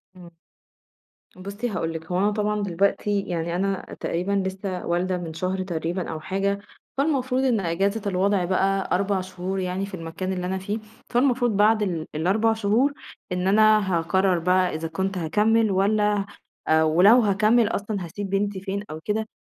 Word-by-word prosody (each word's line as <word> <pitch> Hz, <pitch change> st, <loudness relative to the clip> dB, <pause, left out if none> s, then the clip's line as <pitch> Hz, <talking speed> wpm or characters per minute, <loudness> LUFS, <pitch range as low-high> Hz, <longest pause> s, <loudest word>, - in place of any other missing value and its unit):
إمم. 175 Hz, -1 st, -12 dB, 1.1 s
بُصّي 200 Hz, +6 st, -4 dB
هاقول 165 Hz, -5 st, -2 dB
لكِ 160 Hz, 0 st, -6 dB
هو 180 Hz, -, +1 dB
أنا 205 Hz, +2 st, +2 dB
طبعًا 210 Hz, 0 st, -1 dB
دلوقتي، 200 Hz, +2 st, +1 dB
يعني 170 Hz, -2 st, -3 dB
أنا 195 Hz, +1 st, -1 dB
تقريبًا 180 Hz, +4 st, -2 dB, 0.2 s
لسّه 190 Hz, -1 st, -5 dB
والدة 180 Hz, +2 st, 0 dB
من 170 Hz, -2 st, -6 dB
شهر 185 Hz, +3 st, -2 dB
تقريبًا 175 Hz, 0 st, -3 dB
أو 160 Hz, -, -5 dB
حاجة، 195 Hz, +4 st, -1 dB, 0.4 s
فالمفروض 265 Hz, -3 st, +1 dB
إن 245 Hz, -5 st, +2 dB
إجازة 195 Hz, +5 st, 0 dB
الوضع 190 Hz, 0 st, +1 dB
بقى 190 Hz, +1 st, +1 dB
4 195 Hz, 0 st, 0 dB
شهور 185 Hz, +1 st, -4 dB
يعني 185 Hz, +1 st, -2 dB
في 200 Hz, -, -12 dB
المكان 175 Hz, +2 st, -4 dB
اللي 180 Hz, -1 st, -3 dB
أنا 190 Hz, +1 st, -1 dB
فيه، 205 Hz, +4 st, -3 dB, 0.3 s
فالمفروض 245 Hz, -3 st, +2 dB
بعد 215 Hz, +1 st, +4 dB
ال 170 Hz, -5 st, -3 dB
ال4 200 Hz, +8 st, +2 dB
شهور، 225 Hz, +6 st, +1 dB, 0.4 s
إن 180 Hz, +1 st, -1 dB
أنا 215 Hz, -2 st, +4 dB
هاقرر 185 Hz, +2 st, +1 dB
بقى 180 Hz, 0 st, +2 dB
إذا 165 Hz, +1 st, -3 dB
كنت 190 Hz, +3 st, -2 dB
هاكمّل 215 Hz, +6 st, +2 dB
والّا، 205 Hz, +1 st, +2 dB, 0.6 s
ولو 180 Hz, +10 st, +6 dB
هاكمّل 215 Hz, +1 st, +3 dB
أصلًا 205 Hz, -4 st, -3 dB
هاسيب 195 Hz, +4 st, -6 dB
بنتي 200 Hz, 0 st, -1 dB
فين 195 Hz, +1 st, -4 dB
أو 155 Hz, -, -6 dB
كده، 220 Hz, +1 st, -1 dB
195 Hz, 160 wpm, -24 LUFS, 180-210 Hz, 1.1 s, ولو